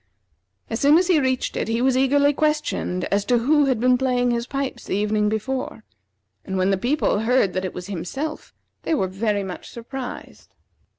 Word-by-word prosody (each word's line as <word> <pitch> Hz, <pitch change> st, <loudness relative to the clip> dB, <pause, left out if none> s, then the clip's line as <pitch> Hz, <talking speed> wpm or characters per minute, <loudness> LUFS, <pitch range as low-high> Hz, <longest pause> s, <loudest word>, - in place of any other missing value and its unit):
As 225 Hz, -, -3 dB
soon 290 Hz, +3 st, +6 dB
as 365 Hz, -, +3 dB
he 340 Hz, -4 st, +5 dB
reached 260 Hz, -2 st, -1 dB
it, -, -, -2 dB
he 225 Hz, +1 st, 0 dB
was 260 Hz, +1 st, +2 dB
eagerly 285 Hz, +2 st, +3 dB
questioned 300 Hz, -12 st, -1 dB
as 200 Hz, 0 st, +2 dB
to 245 Hz, -, +3 dB
who 290 Hz, +5 st, +3 dB
had 260 Hz, -4 st, +1 dB
been 250 Hz, +1 st, +3 dB
playing 250 Hz, -2 st, +1 dB
his 235 Hz, 0 st, -2 dB
pipes 275 Hz, 0 st, -4 dB
the -, -, -2 dB
evening 210 Hz, +1 st, +1 dB
before, 225 Hz, +1 st, -3 dB, 0.6 s
and 190 Hz, -, -4 dB
when 185 Hz, +1 st, +2 dB
the -, -, +3 dB
people 245 Hz, +2 st, 0 dB
heard 225 Hz, -4 st, +2 dB
that 185 Hz, +1 st, -2 dB
it 185 Hz, -, -5 dB
was 180 Hz, -, -6 dB
himself, 205 Hz, -, -5 dB, 0.3 s
they 325 Hz, -, 0 dB
were 195 Hz, -, +1 dB
very 205 Hz, +2 st, -1 dB
much 185 Hz, -2 st, -7 dB
surprised. 245 Hz, +2 st, -8 dB
245 Hz, 190 wpm, -23 LUFS, 205-270 Hz, 0.6 s, soon